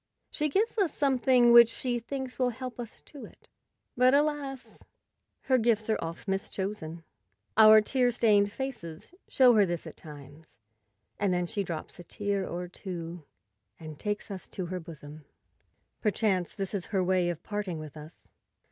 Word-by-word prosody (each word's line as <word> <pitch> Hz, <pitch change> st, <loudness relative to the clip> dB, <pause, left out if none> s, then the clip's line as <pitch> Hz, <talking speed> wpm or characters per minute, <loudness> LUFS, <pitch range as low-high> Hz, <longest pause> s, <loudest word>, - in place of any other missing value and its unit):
She 300 Hz, -1 st, -1 dB
gives 430 Hz, +8 st, 0 dB
us 375 Hz, -6 st, +2 dB
something 255 Hz, -4 st, +3 dB
which 235 Hz, -1 st, +9 dB
she 245 Hz, +1 st, -2 dB
thinks 265 Hz, +2 st, -6 dB
will 250 Hz, -1 st, +3 dB
help 250 Hz, 0 st, -7 dB
us 235 Hz, -2 st, -8 dB
to 285 Hz, -, -12 dB
it; -, -, -15 dB, 0.5 s
but, 255 Hz, +2 st, +5 dB
alas! 285 Hz, -3 st, -2 dB, 0.6 s
her 260 Hz, -1 st, +2 dB
gifts 225 Hz, -1 st, +1 dB
are 220 Hz, -, 0 dB
oft 165 Hz, +4 st, -7 dB
mischosen. 190 Hz, -4 st, -4 dB, 0.5 s
Our 215 Hz, 0 st, +8 dB
tear 250 Hz, +3 st, +1 dB
stained 210 Hz, -4 st, +3 dB
faces 230 Hz, -, -7 dB
show 255 Hz, -2 st, +5 dB
her 210 Hz, -2 st, +5 dB
this 175 Hz, -3 st, -2 dB
at -, -, -10 dB
times, 150 Hz, 0 st, -13 dB, 0.6 s
and 200 Hz, -2 st, +1 dB
then 180 Hz, 0 st, 0 dB
she 200 Hz, +3 st, -2 dB
drops 170 Hz, -1 st, -6 dB
a -, -, -8 dB
tear 200 Hz, +1 st, -2 dB
or 180 Hz, +1 st, -5 dB
two 175 Hz, -3 st, -7 dB, 0.5 s
and 155 Hz, -2 st, -9 dB
takes 210 Hz, 0 st, -3 dB
us 190 Hz, -3 st, -7 dB
to 185 Hz, -, -5 dB
her 185 Hz, -, -2 dB
bosom. 155 Hz, -2 st, -11 dB, 0.8 s
Perchance 205 Hz, -4 st, 0 dB
this 195 Hz, -1 st, -4 dB
is 195 Hz, -3 st, -2 dB
her 195 Hz, -3 st, 0 dB
way 180 Hz, -1 st, +2 dB
of 170 Hz, -2 st, -5 dB
parting 205 Hz, -5 st, -4 dB
with 155 Hz, -2 st, -9 dB
us. 155 Hz, +1 st, -12 dB
205 Hz, 165 wpm, -29 LUFS, 175-245 Hz, 0.8 s, which